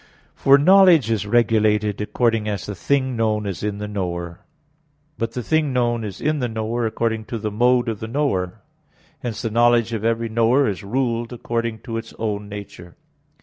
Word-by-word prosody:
For 135 0 +5
knowledge 175 - +6
is 105 -2 -1
regulated 105 -2 +2
according 115 0 0
as 100 -3 -3
the 105 - -5
thing 130 +7 0
known 110 -2 0
is 100 -3 -4
in 105 -1 -2
the 105 0 -5
knower. 85 -4 -4 0.8
But 115 0 -2
the 125 - -4
thing 155 +2 +1
known 120 -2 0
is 100 -3 -6
in 155 0 0
the 125 - 0
knower 115 +1 -2
according 110 0 -2
to 120 -1 -5
the 105 -1 -3
mode 120 +3 +2
of 110 -3 -3
the 110 - -5
knower. 110 -9 -2 0.6
Hence 115 -1 -5
the 115 - -2
knowledge 120 0 +3
of 110 -2 -3
every 115 0 0
knower 115 +5 +2
is 100 0 -3
ruled 120 +1 -1
according 115 -2 -3
to 115 -3 -5
its 115 0 -8
own 105 -2 -3
nature. 100 -4 -9
115 Hz, 185 wpm, -21 LUFS, 105-120 Hz, 0.8 s, knowledge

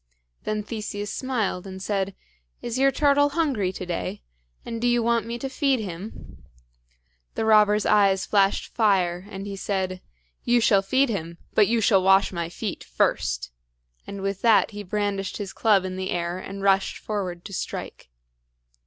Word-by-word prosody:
Then 215 0 -1
Theseus 205 -2 -5
smiled, 220 -8 -2
and 190 0 -8
said: 195 0 -2 0.4
"Is 240 +2 -4
your 275 0 +5
turtle 285 0 +3
hungry 275 - 0
to 185 - -6
day? 175 - -4 0.4
and 230 -1 -5
do 245 - +2
you 240 -1 +2
want 230 -1 +1
me 235 +1 -3
to 270 - -4
feed 270 -1 +1
him?" 195 0 -8 0.9
The 220 - -1
robber's 210 -1 +5
eyes 195 -2 +3
flashed 195 -1 +1
fire, 185 -5 +2
and 195 -1 -7
he 200 -1 -5
said, 190 -2 -2 0.4
"You 240 0 +3
shall 205 -4 +4
feed 260 +7 +2
him, 170 -5 -4 0.2
but 210 -2 +5
you 230 0 +1
shall 200 -2 +4
wash 195 +1 +4
my 170 -2 -3
feet 195 +3 -5
first;" 60 0 -1 0.6
and 200 -1 -6
with 195 -1 -2
that 225 -2 +4
he 205 0 -6
brandished 200 0 -2
his 200 -2 -6
club 205 -4 +3
in 185 0 -4
the 190 0 -3
air 175 +1 -2
and 195 +1 -7
rushed 195 -1 +2
forward 185 -5 -4
to 200 - -8
strike. 175 - -6
200 Hz, 170 wpm, -25 LUFS, 190-225 Hz, 0.9 s, your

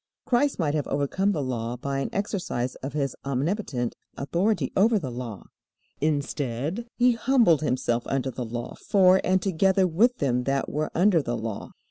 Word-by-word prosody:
Christ 270 +3 +2
might 150 -5 0
have 150 -2 -1
overcome 145 +8 0
the 155 -7 -1
Law 120 -2 -3
by 135 +2 -3
an 135 - -2
exercise 180 - -2
of 135 +1 -6
His 140 -2 -1
omnipotent 140 - -2 0.2
authority 170 +1 0
over 220 +3 +4
the 140 -10 -4
Law. 120 -4 -6 0.6
Instead, 145 - -2
He 250 0 +4
humbled 235 - +3
Himself 125 -4 0
under 135 -1 -1
the 125 +1 -5
Law 120 +1 -5
for 190 -1 +5
and 185 0 +2
together 190 +1 +3
with 220 +9 +3
them 125 -3 0
that 135 0 0
were 150 +1 -2
under 180 -1 +4
the 120 -3 -3
Law. 110 -2 -5
150 Hz, 165 wpm, -26 LUFS, 125-195 Hz, 0.6 s, for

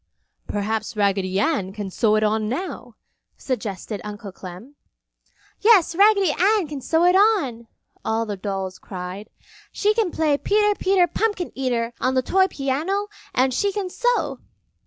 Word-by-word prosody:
"Perhaps 215 +1 -2
Raggedy 195 -2 +1
Ann 265 - 0
can 205 -2 -5
sew 215 +2 +2
it 215 - +2
on 215 0 +1
now!" 345 +11 -5 0.4
suggested 210 -5 -4
Uncle 210 -1 -7
Clem. 185 +8 -10 0.9
"Yes, 415 -7 +5
Raggedy 400 -1 +4
Ann 390 +3 +2
can 290 -2 -6
sew 325 +5 +1
it 360 +1 +5
on!" 360 - +2 0.4
all 225 +1 0
the 210 -2 -4
dolls 190 -1 -4
cried. 185 +2 -7 0.4
"She 420 +1 +1
can 440 -4 +1
play 310 -3 +1
Peter, 415 0 +2
Peter, 380 -2 +3
Pumpkin 405 -1 -1
Eater 240 -3 -1
on 260 +1 +1
the 255 - +2
toy 380 +7 +3
piano 335 +8 -2 0.3
and 260 +1 +2
she 400 +10 +1
can 385 -2 -4
sew!" - - 0
265 Hz, 150 wpm, -22 LUFS, -, 0.9 s, Yes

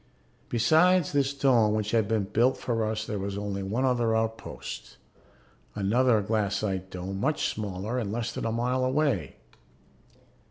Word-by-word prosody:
Besides 160 +9 +4
this 140 -1 +1
dome 125 -6 +3
which 105 0 -1
had 110 -3 +2
been 110 -1 +1
built 120 +6 +2
for 115 -2 -1
us 110 0 -2
there 105 -3 -3
was 100 +1 -4
only 100 -1 -3
one 110 +7 -1
other 120 -3 +2
outpost, 115 0 -4 0.8
another 110 +2 +2
glassite 100 -3 -1
dome 95 +1 -5
much 145 +7 0
smaller 105 +3 -3
and 105 -4 -3
less 115 +1 -2
than - - -5
a 115 - 0
mile 125 +3 0
away. 130 - 0
110 Hz, 150 wpm, -27 LUFS, 100-125 Hz, 0.8 s, Besides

